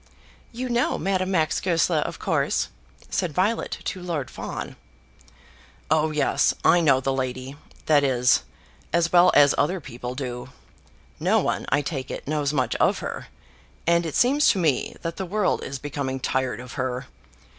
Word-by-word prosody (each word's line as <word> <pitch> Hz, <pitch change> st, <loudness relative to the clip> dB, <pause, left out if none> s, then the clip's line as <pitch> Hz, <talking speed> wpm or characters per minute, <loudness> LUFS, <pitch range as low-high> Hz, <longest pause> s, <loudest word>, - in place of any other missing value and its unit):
"You 250 Hz, +2 st, -4 dB
know 240 Hz, 0 st, +1 dB
Madame 185 Hz, -1 st, 0 dB
Max 165 Hz, -5 st, +1 dB
Goesler, 170 Hz, -2 st, +2 dB
of -, -, -3 dB
course?" -, -, 0 dB, 0.4 s
said 180 Hz, -5 st, -1 dB
Violet 210 Hz, +5 st, 0 dB
to 185 Hz, -, -3 dB
Lord 155 Hz, -8 st, -3 dB
Fawn. -, -, -6 dB, 1.2 s
"Oh 155 Hz, 0 st, +3 dB
yes, 150 Hz, -2 st, +2 dB
I 175 Hz, -, +6 dB
know 140 Hz, -5 st, +4 dB
the 135 Hz, 0 st, 0 dB
lady; 130 Hz, +1 st, -3 dB, 0.3 s
that 150 Hz, -2 st, +4 dB
is, 125 Hz, -2 st, +3 dB, 0.5 s
as 170 Hz, 0 st, +2 dB
well 180 Hz, +1 st, +7 dB
as 145 Hz, -1 st, +7 dB
other 180 Hz, +6 st, +1 dB
people 125 Hz, -4 st, -7 dB
do. 125 Hz, -2 st, -5 dB, 0.7 s
No -, -, +3 dB
one, -, -, -1 dB
I 145 Hz, +2 st, +2 dB
take 135 Hz, -3 st, -4 dB
it, -, -, -6 dB
knows 145 Hz, -1 st, 0 dB
much 130 Hz, -5 st, 0 dB
of -, -, +3 dB
her; -, -, -6 dB, 0.6 s
and 170 Hz, +1 st, +3 dB
it 160 Hz, -3 st, -4 dB
seems 280 Hz, +4 st, +4 dB
to -, -, +3 dB
me 155 Hz, -7 st, 0 dB
that 165 Hz, 0 st, -4 dB
the 190 Hz, -, -2 dB
world 210 Hz, +1 st, 0 dB
is 135 Hz, -, -5 dB
becoming 135 Hz, -1 st, -4 dB
tired 130 Hz, -1 st, -1 dB
of 125 Hz, 0 st, -9 dB
her. 130 Hz, 0 st, -3 dB
150 Hz, 165 wpm, -24 LUFS, 130-175 Hz, 1.2 s, well